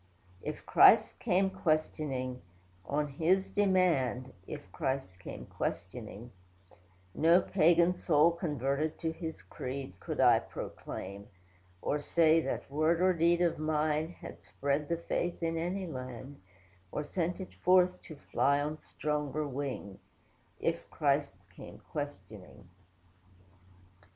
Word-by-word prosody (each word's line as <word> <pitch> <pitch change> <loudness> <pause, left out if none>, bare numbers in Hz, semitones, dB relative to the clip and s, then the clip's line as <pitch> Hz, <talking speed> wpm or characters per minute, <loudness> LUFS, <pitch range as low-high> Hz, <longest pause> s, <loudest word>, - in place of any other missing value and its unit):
If - - -6
Christ - - +6
came 190 +2 +2
questioning, 145 -7 -1 0.5
on 150 +1 0
His 170 +7 +1
demand, 165 - +2
(If 95 - -8
Christ 130 -8 -3
came - - -8
questioning,) 105 +6 -5 0.8
No 165 - +5
pagan 175 -1 +4
soul 165 -2 +4
converted 150 -2 -1
to 160 - 0
His 160 - -6
creed 130 +3 -6
Could - - -5
I - - +6
proclaim; 100 +2 -7 0.6
or 150 - 0
say, 165 +1 +4
that - - -3
word 155 +3 +2
or 185 +1 +4
deed 170 +1 +3
Of 170 -3 +1
mine, 155 0 0
had - - -11
spread 140 +1 -2
the 170 - +1
faith 170 +1 -2
in 165 0 0
any 180 +4 -2
land; 130 - -7 0.5
Or 150 - -2
sent 175 +4 -2
it 190 - -7
forth, 180 0 +3
to 155 - -8
fly 140 0 +1
on 150 +2 -3
stronger 150 0 -2
wing; 130 -8 -5 0.6
If - - -2
Christ - - +1 0.2
came - - -10
questioning. 105 -8 -7
150 Hz, 120 wpm, -31 LUFS, 130-170 Hz, 0.8 s, Christ